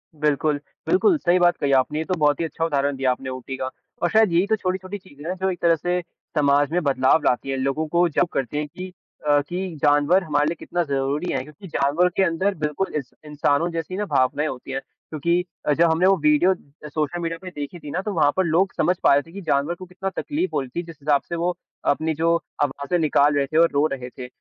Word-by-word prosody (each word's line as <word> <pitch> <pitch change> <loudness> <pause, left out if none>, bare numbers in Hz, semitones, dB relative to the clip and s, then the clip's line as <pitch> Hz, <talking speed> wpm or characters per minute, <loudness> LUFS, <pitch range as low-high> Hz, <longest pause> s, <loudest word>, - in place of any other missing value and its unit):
बिल्कुल, 150 0 +1 0.3
बिल्कुल 370 -1 +4
सही 180 -8 +2
बात 175 0 +4
कही 140 -1 0
आपने, 150 +4 -1
ये 160 - -2
तो 185 - -1
बहुत 145 -1 +3
ही 165 - 0
अच्छा 165 +1 -2
उदाहरण 140 -3 0
दिया 130 -1 +1
आपने 130 +1 -4
ऊटी 130 +1 -6
का। 130 0 -3 0.3
और 175 - +2
शायद 220 -2 +4
यही 175 +4 +3
तो 220 - +3
छोटी-छोटी 190 0 -3
चीज़े 155 -6 -13
हैं, 185 - -2
जो 190 +1 -1
एक 180 - -6
तरह 170 -1 +4
से 175 +3 -1 0.4
समाज 145 0 +3
में 180 - +1
बदलाव 135 +1 +3
लाती 125 +2 +1
हैं, 135 - -1
लोगों 135 +4 -1
को 175 +3 +3
जागरूक 170 +3 +1
करती 135 +2 -2
हैं 150 0 -1
कि 185 +5 -8 0.4
अ, 145 0 +5
कि 175 +3 -5
जानवर 145 +6 +4
हमारे 145 -3 +1
लिए 165 - -1
कितना 175 - -3
ज़रूरी 140 +5 -1
हैं, 130 - 0
क्योंकि 150 +7 -13
जानवर 155 +3 +2
के 195 - +4
अंदर 190 +3 +1
बिल्कुल 150 +4 -2
इस 140 -5 -3 0.2
इंसानो 150 +1 +1
जैसी 165 +2 -4
ना 210 - -1
भावनाएँ 140 0 +1
होती 130 -1 -6
हैं। 135 - -1 0.3
क्योंकि 170 +3 +1 0.2
अ, 150 - +3
जब 170 +3 +4
हमने 170 +3 +3
वो 195 0 +5
वीडियो 150 +5 +4 0.4
सोशल 155 +3 -2
मीडिया 165 0 -2
पे 185 - -7
देखी 145 +4 -6
थी 145 -3 -8
ना, 185 - -1
तो 205 +1 -4
वहाँ 150 -4 +3
पर 190 - +4
लोग 175 +4 +2
समझ 180 - +2
पा - - +6
रहे 145 - +4
थे 165 - -17
कि 200 +3 -8
जानवर 145 +1 0
को 185 - -10
कितना 185 +2 -5
तकलीफ 320 +5 -2
हो - - +1
रही 130 - -7
थी 175 - -1
जिस 165 -3 -11
हिसाब 145 -1 +2
से 170 - -2
वो 175 +2 0 0.4
अपनी 160 +2 -2
जो 165 0 +4 0.3
आवाज़ें 140 +5 -1
निकाल 145 -2 +3
रहे 140 -1 +2
थे 155 - -2
और 165 0 +6
रो 145 +1 +3
रहे 125 -2 -6
थे। 125 0 -9
155 Hz, 245 wpm, -23 LUFS, 145-180 Hz, 0.4 s, पा